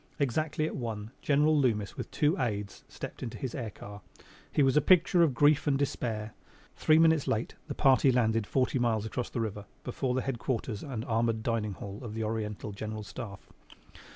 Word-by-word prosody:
Exactly 150 +3 0
at - - -3
one 110 -3 -4
General 150 +2 +3
Loomis 115 -8 +1
with - - -6
two 150 +3 +2
aides 105 -4 -3
stepped - - -8
into 115 - -5
his 130 -3 -4
air 120 -5 -4
car. 100 0 -10 0.5
He 145 - +3
was 135 0 +3
a 150 - +6
picture 175 +1 +5
of 155 -7 +3
grief 145 +3 +4
and 140 -2 +3
despair. 115 -6 -2 0.4
Three 155 - +4
minutes 160 -2 +4
late 110 +2 -1
the - - -4
party 135 0 +5
landed 115 -3 +2
forty 130 0 +1
miles 110 -3 +1
across 120 +2 -3
the 120 - -2
river 105 -2 -4 0.2
before 125 0 -2
the 130 - 0
headquarters 120 -4 -2
and 120 -5 -5
armored 115 -1 0
dining 110 -3 -1
hall 100 +3 -8
of 110 -4 -6
the 110 - -2
Oriental 105 -1 -3
General 110 +1 -5
Staff. 100 -3 -9
120 Hz, 185 wpm, -30 LUFS, 110-140 Hz, 0.5 s, a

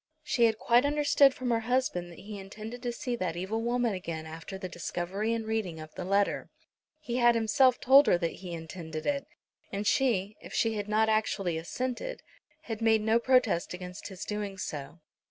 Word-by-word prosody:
She 240 -5 +3
had 220 -1 +2
quite 240 +2 +4
understood 285 -1 +4
from 250 -1 -2
her 230 - +3
husband 225 -7 -1
that 170 - -13
he 205 0 -8
intended 215 +5 -8
to 245 - -2
see 245 0 -3
that 180 -5 -2
evil 200 +5 -2
woman 240 -1 +1
again 165 -4 -5
after 160 +4 -7
the 190 -1 -5
discovery 180 +4 -3
and 230 -1 -1
reading 215 -7 -2
of 155 0 -10
the - - -5
letter. 200 +2 +1 0.5
He 250 -6 -3
had 240 -1 +5
himself 245 +3 +4
told 275 +3 +7
her - - +5
that 170 -1 -2
he 180 -2 -7
intended 160 -1 -6
it; 280 -1 -1 0.4
and 200 +1 -3
she, 210 -5 +1
if - - -9
she 225 -1 +2
had 210 -1 -4
not 220 +1 +3
actually 215 -5 +1
assented, 255 - -4 0.4
had 225 -7 -6
made 220 -1 +4
no 220 +2 +3
protest 235 -9 +2
against 180 +1 -8
his 190 -1 -7
doing 205 -2 -4
so. 150 -2 -6
215 Hz, 190 wpm, -29 LUFS, 180-240 Hz, 0.5 s, told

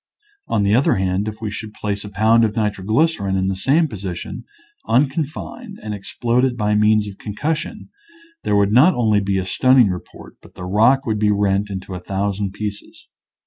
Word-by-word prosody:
On 105 - +1
the 100 +1 +2
other 125 +5 +3
hand, 95 +2 -1
if 110 +1 -6
we 110 -2 -3
should 105 +1 -7
place 100 -1 -3
a 105 - -8
pound 110 +3 +3
of 110 -1 0
nitroglycerin 105 - 0
in 95 0 0
the 95 - -1
same 145 - +2
position 95 - -6 0.4
unconfined 155 - -1
and 105 - -4
explode 120 +5 -1
it 125 -2 0
by 105 -1 +1
means 105 0 +3
of 100 -1 -10
concussion, 155 - -4 0.5
there 105 - 0
would 100 0 +3
not 140 +11 +5
only 110 -4 +2
be 100 -1 -1
a 95 - -1
stunning 130 +3 +4
report, 90 -1 -8
but - - -18
the 90 - -7
rock 115 +8 +3
would 110 -2 -1
be 105 0 +2
rent 100 0 +1
into 95 -1 -6
a 90 - -5
thousand 100 +1 -2
pieces. 105 0 -7
105 Hz, 185 wpm, -20 LUFS, 100-120 Hz, 0.5 s, not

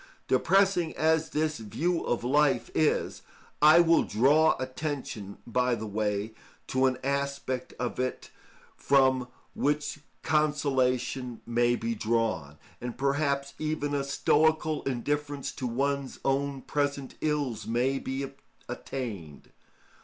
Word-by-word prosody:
Depressing 180 +3 +2
as 160 0 +2
this 155 -1 -1
view 165 - -1
of 120 - -1
life 145 +3 +2
is, 155 - +1 0.4
I 155 +3 +8
will 165 -1 +5
draw 145 +8 +4
attention, 130 -6 -5
by 125 +1 +1
the 110 -1 -5
way, 105 0 -2 0.4
to 130 0 +3
an 130 -1 0
aspect 140 -2 -2
of 125 0 -3
it 130 0 -3 0.4
from 130 -2 +3 0.3
which 145 +1 -1 0.2
consolation 130 -5 0
may 120 +1 +2
be 115 -1 -2
drawn, 110 -10 -1 0.2
and 120 -1 -5
perhaps 140 0 0
even 155 -2 -2
a 140 -1 0
stoical 155 +2 +2
indifference 145 +2 -2
to 130 - -4
one's 140 +2 -1
own 135 0 0
present 140 -2 -2
ills 145 -6 -1
may 125 +4 +1
be 135 +1 -3 0.4
attained. 100 - -6
135 Hz, 115 wpm, -28 LUFS, 120-150 Hz, 0.4 s, I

